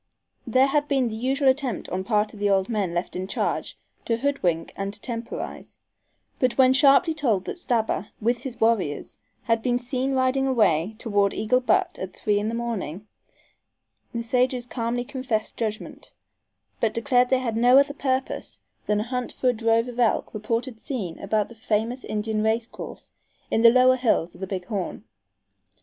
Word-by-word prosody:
There 255 +3 +4
had 290 +1 +1
been 270 -4 +1
the 220 - -5
usual 265 +4 0
attempt 260 -5 +1
on 185 +1 -2
part 210 +1 +1
of 210 - -11
the 205 0 +1
old 195 -1 +2
men 205 -6 -1
left 175 - -3
in 185 +1 -3
charge - - -2 0.3
to 230 - +1
hoodwink 205 -12 -1
and 195 0 -3
to - - -12
temporize, 230 0 -6 0.6
but 255 -2 +1
when 260 -1 +6
sharply 280 +4 +5
told 235 -12 0
that - - -5
Stabber, 225 - 0
with 235 +2 +1
his 250 -1 -7
warriors, 215 -10 0 0.2
had 230 -1 +1
been 245 0 +1
seen 255 +2 -2
riding 260 +1 +2
away 210 -6 +2
toward 205 -3 +1
Eagle 250 +4 +2
Butte 370 +9 +1
at 185 0 -6
three 205 -1 +1
in 210 +1 -1
the 230 - -3
morning, 215 -6 -4 1.1
the 235 -1 -3
sages 250 +1 +1
calmly 245 0 -2
confessed 250 -5 -3
judgment, 215 -1 -5 0.7
but 225 -2 0
declared 250 +1 +2
they 260 - +4
had 240 -3 -2
no 245 +3 +6
other 280 +1 +4
purpose 265 -2 -2 0.3
than 210 0 +2
a - - -1
hunt 250 +1 -3
for 255 - 0
a - - +2
drove 230 +1 +2
of 245 0 -7
elk 235 -2 +1
reported 230 +3 -3
seen 210 - -5
about 210 +1 0
the - - -13
famous 225 +2 -2
Indian 215 0 -2
race 220 +1 +1
course - - -10 0.4
in 225 - +2
the 230 - +9
lower 255 +1 +5
hills 220 -9 +1
of - - -15
the 190 - -3
Big 185 -2 -4
Horn. 195 - -4
230 Hz, 180 wpm, -25 LUFS, 210-255 Hz, 1.1 s, the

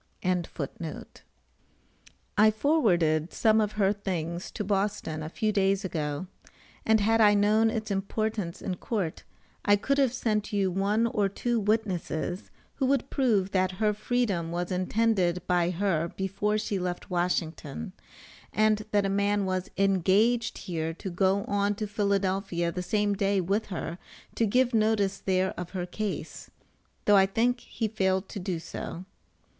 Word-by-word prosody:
] - - -27 2.2
I 215 +1 +7
forwarded 180 - +2
some 220 -1 +3
of 210 -1 -1
her 200 -1 +2
things 175 -4 -4
to - - -4
Boston 195 -5 -1
a 155 - -5
few 215 +5 0
days 195 0 +1
ago, 150 -2 -3 0.6
and 220 0 +4
had 225 +2 +3
I 210 -1 +6
known 215 +2 +4
its 220 -1 -3
importance 200 -2 -2
in 185 -2 -3
court, 195 -8 -3 0.4
I 205 - +5
could 275 +8 0
have 270 -4 +3
sent 215 -3 -1
you 195 -3 +1
one 200 +5 +1
or 210 -3 +1
two 240 +4 -1
witnesses 195 -5 -1 0.3
who 265 - +1
would 275 -1 +1
prove 215 -8 +2
that 185 -1 +1
her 210 +3 +1
freedom 210 -6 -1
was 175 +1 -3
intended 185 -2 +1
by 175 -1 +2
her 175 -3 0
before 195 +4 -1
she 205 -2 -2
left 180 +1 -4
Washington, 165 - -2 0.6
and 215 0 +2
that 205 -2 +2
a - - +2
man 200 +1 +1
was 185 0 -2
engaged 195 +5 +2
here 165 -2 -3
to 190 - -6
go 190 +2 +2
on 205 0 0
to 215 - -3
Philadelphia 195 -4 0
the 180 - -4
same 205 +2 +1
day 200 0 +1
with 195 +5 0
her 175 -2 -5 0.3
to 225 - +1
give 250 +3 +2
notice 215 -3 +2
there 190 0 +1
of 180 -1 -5
her 180 - -2
case, 205 +3 -5 0.6
though 205 -1 +6
I 190 0 +5
think 240 +5 +1
he 225 -1 -3
failed 190 -2 0
to 205 - -6
do 185 -2 -2
so. 170 +2 -7
200 Hz, 155 wpm, -28 LUFS, 180-215 Hz, 2.2 s, I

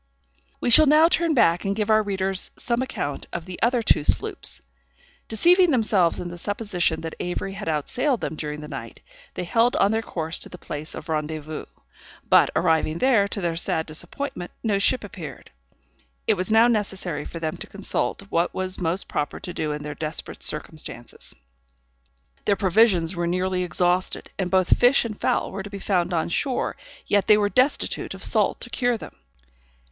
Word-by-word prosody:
We 240 - 0
shall 310 +5 +8
now 305 +3 +6
turn 335 -2 +2
back 170 -8 +3
and 200 -1 -1
give 215 0 0
our 215 0 +5
readers 195 -2 -1
some 240 0 -1
account 145 - -4
of 170 -1 -5
the 185 -1 -8
other 235 0 +2
two 155 - +3
sloops. 430 - +1 0.7
Deceiving 355 - +4
themselves 215 - +2
in 175 - -5
the 175 0 -8
supposition 180 -5 -1
that 160 0 -5
Avery 180 +2 -3
had 200 -1 -7
outsailed 240 - 0
them - - -4
during 150 0 -5
the 150 - -8
night, - - -8 0.3
they - - -3
held 230 +7 +2
on 200 - +3
their 220 0 +1
course 165 -5 -4
to - - -7
the 180 - -10
place 150 -2 -6
of 155 - -8
rendezvouse; 155 -1 -4 0.6
but, - - +5
arriving 160 -2 +2
there, 230 -3 +3
to 200 - -4
their 170 -2 -1
sad 160 -1 0
disappointment 180 - -4
no 210 -3 +1
ship 205 - +2
appeared. - - -9 0.7
It 220 - +4
was 185 +1 -3
now 225 +2 +6
necessary 195 -8 -1
for 165 - -8
them 160 -1 -3
to - - -8
consult - - -2
what 170 +1 0
was 185 0 0
most 175 +3 -1
proper 145 - -3
to 180 - -6
do 155 -1 -2
in 150 0 -4
their 150 0 -5
desperate 155 +2 -5
circumstances. 150 -5 -5 1.1
Their 205 - +3
provisions 190 -3 +3
were 175 0 -1
nearly 185 +1 0
exhausted, 180 +1 0
and 185 -2 0
both 185 -1 +4
fish 245 +1 +5
and 220 -2 -4
fowl - - 0
were 195 - -5
to 205 - -8
be 200 - -7
found 185 -3 0
on 165 -2 0
shore, 260 - -1 0.3
yet 205 -1 +2
they 210 - +7
were 205 -1 +1
destitute 255 +6 0
of - - -8
salt - - +2
to - - -7
cure 245 -2 +1
them. - - -11
185 Hz, 185 wpm, -24 LUFS, 165-220 Hz, 1.1 s, shall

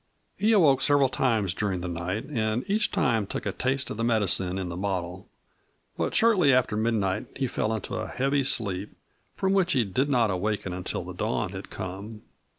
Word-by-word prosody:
He 215 +2 +2
awoke 160 -11 +5
several 145 -2 +4
times 110 -9 +1
during 95 -3 -2
the 90 - -4
night 90 +6 -3
and 115 - -1
each 210 +1 +2
time 115 -5 +1
took - - -4
a - - 0
taste 130 +1 -1
of - - -5
the 115 - -2
medicine 100 -5 +1
in 95 -1 -3
the 85 - -5
bottle. 90 -1 -4 0.7
But - - -2
shortly 205 -11 +5
after 125 -4 +2
midnight 105 -3 0
he 135 - -1
fell 110 -3 -1
into 110 -3 -4
a - - -3
heavy 135 +1 0
sleep, 100 -6 0 0.4
from 190 0 0
which 190 -2 +3
he 125 -5 +2
did 130 +9 0
not 120 -6 +3
awaken 95 0 -2
until 90 0 -3
the - - -8
dawn 65 - -2
had - - -8
come. 100 +4 -7
110 Hz, 190 wpm, -26 LUFS, 95-135 Hz, 0.7 s, awoke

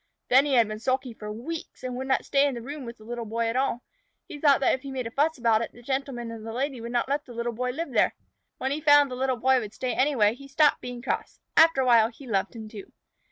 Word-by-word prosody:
Then 265 +3 +5
he 275 - +2
had 230 -3 +5
been 215 0 -6
sulky 255 +1 -1
for 210 -1 -7
weeks, 265 +10 -7
and 255 -1 -4
would 260 +1 -4
not 265 - +1
stay 280 +1 +3
in 275 - -2
the 235 - -6
room 280 +1 -7
with 235 0 -8
the 215 - -16
Little 240 +1 -5
Boy 230 +1 -2
at 230 - -3
all. 255 -2 0 0.4
He 295 - -8
thought 285 -2 +5
that - - +3
if 260 - -2
he 275 - -8
made 265 -1 -3
enough 230 - -6
fuss 315 +3 +1
about 230 -2 +3
it, 230 - -5
the 240 - -15
Gentleman 265 -3 -3
and 225 -1 -8
the 225 - -6
Lady 260 +1 -3
would 235 +1 -6
not 240 0 0
let 285 +2 -1
the 245 - -11
Little 235 0 -2
Boy 250 +2 -2
live 325 +7 -4
there. - - +2 0.4
When 265 - -2
he 300 +2 -2
found 290 -2 +5
the - - -3
Little 260 0 0
Boy 260 +2 +3
would 215 -2 -7
stay 255 +2 -2
anyway, 255 -6 +3
he 275 +3 -12
stopped 290 +1 +3
being 245 -1 -7
cross. - - -3 0.2
After 325 -4 +6
a - - +1
while 230 -3 +6
he 260 +4 -14
loved 205 -1 -1
him 220 -1 -7
too. 215 -2 -10
250 Hz, 285 wpm, -26 LUFS, 230-275 Hz, 0.4 s, After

